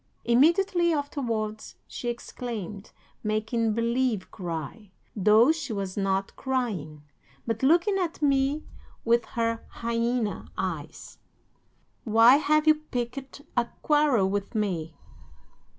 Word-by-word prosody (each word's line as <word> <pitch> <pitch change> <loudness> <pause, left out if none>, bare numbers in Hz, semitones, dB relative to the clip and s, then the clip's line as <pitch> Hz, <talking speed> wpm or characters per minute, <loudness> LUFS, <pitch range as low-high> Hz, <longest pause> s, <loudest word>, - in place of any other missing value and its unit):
Immediately 340 +8 +3
afterwards 235 -8 -3
she 240 - -5
exclaimed, 225 -4 -6 0.3
making 220 +1 0
believe 235 -3 0
cry, 175 +3 -6 0.3
though 215 +6 +5
she 295 -7 -4
was 195 -2 -4
not 195 -1 -1
crying, 200 - -3 0.4
but 225 -1 -2
looking 345 +8 +3
at 350 -3 -2
me 280 0 +1 0.4
with 235 0 +3
her 230 -1 -2
hyena 230 -2 -2
eyes: 165 -5 -5 0.8
"'"Why 230 +3 +6
have 305 +1 +2
you 310 - +7 0.2
picked 260 +3 -5
a 240 -1 +2 0.2
quarrel 295 -10 +3
with 200 +3 -3
me?" 175 -7 -2
230 Hz, 105 wpm, -27 LUFS, 210-275 Hz, 0.8 s, you